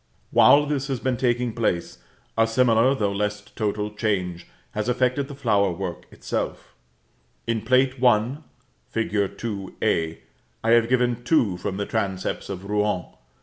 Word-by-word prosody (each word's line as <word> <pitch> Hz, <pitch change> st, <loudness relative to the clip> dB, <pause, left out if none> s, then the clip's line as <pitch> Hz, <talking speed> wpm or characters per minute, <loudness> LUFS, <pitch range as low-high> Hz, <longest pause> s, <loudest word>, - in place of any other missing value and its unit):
While 145 Hz, +1 st, +6 dB
this 140 Hz, -2 st, -2 dB
has 135 Hz, -3 st, -2 dB
been 130 Hz, 0 st, 0 dB
taking 120 Hz, -1 st, 0 dB
place, 100 Hz, -7 st, -1 dB, 0.4 s
a 115 Hz, 0 st, +3 dB
similar, 120 Hz, +2 st, +3 dB
though 105 Hz, -6 st, 0 dB
less 105 Hz, +1 st, -1 dB
total, 105 Hz, 0 st, -3 dB
change 90 Hz, -5 st, -2 dB, 0.2 s
has 105 Hz, +2 st, -2 dB
affected 125 Hz, +2 st, +1 dB
the 140 Hz, -, -8 dB
flowerwork 100 Hz, -8 st, 0 dB
itself. -, -, -4 dB, 0.7 s
In 115 Hz, -1 st, -1 dB
Plate 130 Hz, +2 st, +2 dB
I. 120 Hz, +2 st, +3 dB, 0.5 s
fig. 105 Hz, -3 st, -1 dB
2 100 Hz, -5 st, -5 dB
(a), 80 Hz, 0 st, 0 dB, 0.4 s
I 115 Hz, -, +1 dB
have 115 Hz, 0 st, +5 dB
given 125 Hz, -1 st, +1 dB
two 120 Hz, -, +2 dB
from 95 Hz, +2 st, -4 dB
the 100 Hz, -, -2 dB
transepts 95 Hz, -4 st, -2 dB
of 100 Hz, 0 st, -6 dB
Rouen. 105 Hz, -3 st, 0 dB
110 Hz, 145 wpm, -24 LUFS, 100-125 Hz, 0.7 s, While